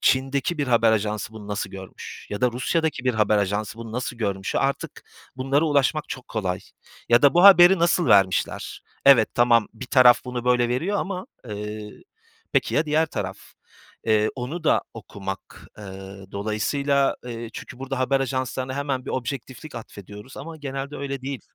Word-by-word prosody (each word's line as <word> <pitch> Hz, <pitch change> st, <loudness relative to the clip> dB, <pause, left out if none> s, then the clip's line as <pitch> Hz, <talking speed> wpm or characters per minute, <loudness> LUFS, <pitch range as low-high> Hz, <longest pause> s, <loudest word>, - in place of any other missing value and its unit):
Çin'deki 135 Hz, +5 st, +1 dB
bir 145 Hz, -, 0 dB
haber 115 Hz, -2 st, +4 dB
ajansı 105 Hz, 0 st, -1 dB
bunu 105 Hz, -2 st, -10 dB
nasıl 105 Hz, -, -3 dB
görmüş 95 Hz, -1 st, -10 dB
ya 105 Hz, -, -4 dB
da 125 Hz, -1 st, +2 dB
Rusya'daki 150 Hz, +2 st, -1 dB
bir 125 Hz, -, +1 dB
haber 105 Hz, -1 st, +3 dB
ajansı 105 Hz, +2 st, -2 dB
bunu 115 Hz, -1 st, -8 dB
nasıl 125 Hz, 0 st, -3 dB
görmüş? 100 Hz, -3 st, -2 dB
Artık 140 Hz, 0 st, -2 dB, 0.3 s
bunlara 135 Hz, +4 st, +1 dB
ulaşmak 150 Hz, 0 st, +1 dB
çok 130 Hz, -, -7 dB
kolay 95 Hz, -5 st, -2 dB, 0.5 s
ya 120 Hz, +1 st, +5 dB
da 145 Hz, -, +6 dB
bu 175 Hz, +2 st, +5 dB
haberi 190 Hz, -1 st, +9 dB
nasıl 170 Hz, -1 st, +2 dB
vermişler? 95 Hz, -4 st, +2 dB, 0.2 s
Evet, 120 Hz, -6 st, +7 dB
tamam, 120 Hz, -2 st, +4 dB
bir 125 Hz, +3 st, -8 dB
taraf 125 Hz, -2 st, +6 dB
bunu 125 Hz, -1 st, -5 dB
böyle 125 Hz, -1 st, +3 dB
veriyor 165 Hz, +12 st, -1 dB
ama, 185 Hz, -1 st, -4 dB, 0.2 s
eee, 105 Hz, 0 st, -6 dB, 0.6 s
peki -, -, +1 dB
ya 155 Hz, +1 st, +2 dB
diğer 155 Hz, +2 st, +2 dB
taraf? -, -, -5 dB, 0.7 s
Eee, 110 Hz, -1 st, +3 dB
onu 145 Hz, +7 st, -5 dB
da -, -, +3 dB
okumak, 95 Hz, -1 st, -8 dB
eee, 105 Hz, -, -9 dB, 0.5 s
dolayısıyla 135 Hz, +7 st, 0 dB
Eee, 115 Hz, -1 st, -6 dB
çünkü 125 Hz, -, -9 dB
burada 135 Hz, 0 st, -4 dB
haber 135 Hz, +1 st, +1 dB
ajanslarına 130 Hz, 0 st, -2 dB
hemen 140 Hz, -2 st, -2 dB
bir -, -, -5 dB
objektiflik 130 Hz, +3 st, -5 dB
atfediyoruz 105 Hz, +1 st, -10 dB
ama 160 Hz, +3 st, -8 dB
genelde 140 Hz, 0 st, -5 dB
öyle 140 Hz, -1 st, -5 dB
değil. 135 Hz, -1 st, -4 dB
125 Hz, 165 wpm, -24 LUFS, 110-140 Hz, 0.7 s, haberi